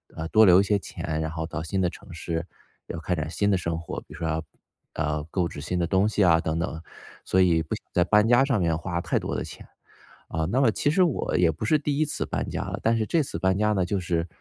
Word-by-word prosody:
呃， 80 +1 -4
多 110 +2 +6
留 90 -1 +7
一 - - +4
些 100 0 +1
钱， 80 -4 -4
然 80 - -2
后 80 0 -3
到 80 -1 -4
新 90 +4 -2
的 90 - +2
城 - - -13
市， 85 0 -3 0.4
要 85 - -5
开 80 +3 -2
展 80 -1 -3
新 100 +5 0
的 95 - +3
生 85 -2 -2
活。 85 - -6
比 - - -15
如 - - -9
说 80 - -3
要， 80 0 -1 0.5
呃， 75 0 -1
购 90 -1 0
置 75 - -8
新 90 +5 -2
的 85 - +1
东 95 +4 +2
西 105 -1 +1
啊 85 -3 +5
等 80 0 -2
等， 80 -1 -3 0.4
所 95 - +1
以 85 -3 +4
不 80 - -3
想 - - -12
在 90 - +4
搬 105 +4 +4
家 120 +3 +5
上 135 -6 +1
面 85 -3 +1
花 85 +2 -3
太 - - 0
多 - - -4
的 - - -2
钱。 - - -10 0.7
啊， 80 0 -1
那 130 +4 +2
么 125 -5 +4
其 145 - +1
实 185 +4 +3
我 170 -7 +1
也 85 -1 +4
不 80 +8 -5
是 155 +7 +3
第 145 -1 -1
1 155 - +2
次 150 - -3
搬 - - -3
家 - - -3
了， - - -5
但 115 +1 +3
是 115 - +1
这 165 -2 +2
次 85 - -5
搬 95 +2 +2
家 105 +1 +2
呢 95 -3 +1
就 95 +2 -1
是， 85 -2 -1
90 Hz, 295 characters per minute, -26 LUFS, 80-105 Hz, 0.7 s, 留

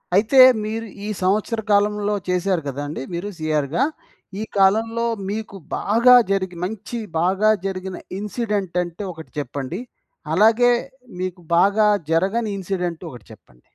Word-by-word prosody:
అయితే 225 +6 +4 0.2
మీరు 225 +1 -3 0.2
ఈ - - -3
సంవత్సర 210 +4 +1
కాలంలో 205 0 +2
చేసారు 180 -1 +1
గదండీ! 145 +1 -4
మీరు 175 +4 -3
సీఆర్‌గా. 155 - 0 0.6
ఈ - - -1
కాలంలో 225 +4 +3 0.2
మీకు 215 -1 -5 0.2
బాగా 235 +4 +5 0.2
జరిగి 190 -2 -1
మంచి 220 +3 -5 0.2
బాగా 190 +5 +2 0.2
జరిగిన 190 -1 -4 0.2
ఇన్సిడెంట్ 205 -4 -3
అంటే 175 +3 -7
ఒకటి 160 -1 -12
చెప్పండి. 140 - -5 0.5
అలాగే 225 +6 +5 0.5
మీకు 185 -1 -4 0.2
బాగా 205 +3 +4 0.2
జరగని 195 +7 +1
ఇన్సిడెంట్ 180 -3 -3
ఒకటి 120 -5 -12
చెప్పండి. - - -18
195 Hz, 120 wpm, -21 LUFS, 175-215 Hz, 0.6 s, బాగా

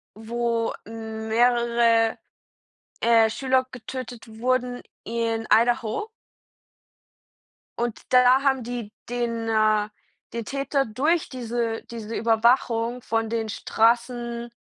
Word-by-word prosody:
wo 230 +1 -1
mehrere, 225 +1 +1 0.8
äh, 225 -1 +5
Schüler 260 +2 +1
getötet 250 -1 -7
wurden, 250 0 0 0.2
in 230 -1 -2
Idaho. 235 - +2 1.7
Und 235 -1 -2
da 255 +1 +6
haben 265 -3 +2
die 235 -3 -5 0.2
den, 230 -2 -2
äh 215 -1 +2 0.4
den 230 -2 -4
Täter, 275 -1 -1
durch 300 +9 0
diese 235 -2 -3
diese 225 -1 -6
Überwachung 230 +1 +2
von 225 0 -1
den 225 -1 -2
Straßen 235 +2 0
235 Hz, 95 wpm, -24 LUFS, 225-245 Hz, 1.7 s, da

